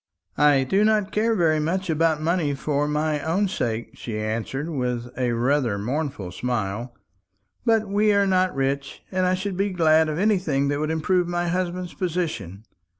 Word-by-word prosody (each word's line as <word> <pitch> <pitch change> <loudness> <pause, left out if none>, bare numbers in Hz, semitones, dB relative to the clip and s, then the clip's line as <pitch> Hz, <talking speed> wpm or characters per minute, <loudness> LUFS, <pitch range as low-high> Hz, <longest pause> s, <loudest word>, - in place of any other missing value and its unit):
"I 145 -2 +5
do 195 +10 +2
not 215 -2 +2
care 225 +2 +1
very 160 -5 +2
much 185 +5 -1
about 160 -1 +2
money 160 -4 +1
for 145 +1 -1
my 150 0 0
own 180 +7 +1
sake," 115 - -3
she 110 -3 -5
answered 115 +7 -3
with 125 -5 -3
rather 125 -1 +1
a - - -4
mournful 125 - -3
smile; 120 +2 -3 0.7
"but 225 -2 +3
we 210 +2 +2
are 200 -1 +3
not 185 -2 +2
rich, 135 +1 -2
and 185 -1 +1
I 185 - +2
should 190 0 -4
be 200 +1 +1
glad 160 -3 +3
of 155 - -2
anything 180 -9 +1
that 145 0 -1
would 155 0 -1
improve 175 +3 +1
my 175 0 -1
husband's 180 0 -2
position. 155 - -3
155 Hz, 170 wpm, -24 LUFS, 135-185 Hz, 0.7 s, I